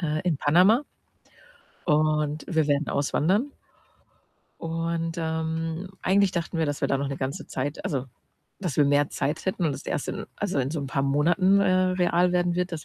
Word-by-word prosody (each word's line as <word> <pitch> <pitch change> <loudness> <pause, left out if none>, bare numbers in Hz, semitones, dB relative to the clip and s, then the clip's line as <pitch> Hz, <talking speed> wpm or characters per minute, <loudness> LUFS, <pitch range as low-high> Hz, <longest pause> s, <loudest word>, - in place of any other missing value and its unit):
äh, 155 -2 -1
in 170 -4 +1
Panama 185 - +4 1.0
und 150 0 +1
wir 160 -3 +1
werden 145 +1 +1
auswandern. 185 - +1 1.1
Und, 165 0 -2
ähm, 160 +2 -3
eigentlich 195 0 +3
dachten 170 -1 -3
wir, 160 - +1
dass 145 -1 -3
wir - - +2
da 135 - +1
noch 140 0 -2
'ne 140 - -4
ganze 135 +1 -4
Zeit 140 +3 -4
also, 135 -4 -1 0.6
dass 175 -7 -3
wir 150 - +5
mehr 145 0 +3
Zeit 150 +6 -3
hätten 185 -2 -1
und 145 -3 +1
es - - -9
erst - - -2
in - - -4
also, 190 -8 -2
in 130 +1 0
so 155 - -3
'n 140 - -4
paar 135 +1 -1
Monaten, 175 +8 +3
äh, 185 -1 +3
real 180 0 +2
werden 175 -1 +1
wird, 180 +1 -1
dass 155 - -5
160 Hz, 185 wpm, -26 LUFS, 145-180 Hz, 1.1 s, wir